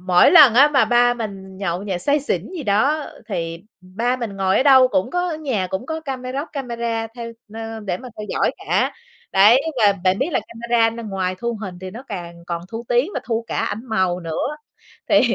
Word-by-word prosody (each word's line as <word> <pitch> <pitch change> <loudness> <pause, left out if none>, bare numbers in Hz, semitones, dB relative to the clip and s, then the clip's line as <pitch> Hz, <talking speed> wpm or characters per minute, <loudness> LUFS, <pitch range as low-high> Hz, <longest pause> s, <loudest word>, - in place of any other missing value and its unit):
mỗi 180 -1 +5
lần 290 -10 +8
á, 285 +4 +7
mà 275 -6 +4
ba 245 +1 +3
mình 195 -4 -7
nhậu 185 -1 -2
nhẹt 190 -4 -3
say 290 0 +2
xỉn 290 - -2
gì 305 - -4
đó, 275 +9 +1 0.2
thì 170 -1 -4 0.2
ba 225 +8 -2
mình 225 -5 -5
ngồi 190 -1 +1
ở - - +4
đâu 260 -2 +7
cũng 280 +1 0
có 355 0 0
ở 310 - -3
nhà 250 -12 -2
cũng 190 +6 -4
có 320 0 -3
cameroc 270 0 -4
camera 235 -4 -3
theo, 230 -1 -6 0.2
ơ, 225 0 -6
để 190 -4 -3
mà 255 - -9
theo 210 - -5
dõi - - +1 0.2
cả. - - +1 0.4
Đấy, 210 +7 +6 0.2
và 205 -1 +6
bạn 185 +1 +3
biết 275 - 0
là - - +2
camera 230 0 +1
nó 230 +1 -7
ngoài 190 -3 -2
thu 235 +2 -2
hình 180 -3 -6
thì 185 0 -6
nó 235 +6 -9
càng 175 -4 -6
còn 170 -1 -3
thu 230 +1 -5
tiếng 245 +10 +2
và - - -2
thu 230 -1 -2
cả - - -3
ảnh 220 - -2
màu 185 -6 0
nữa. 170 - -3 0.5
Thì - - +6
225 Hz, 220 wpm, -21 LUFS, 190-255 Hz, 0.5 s, lần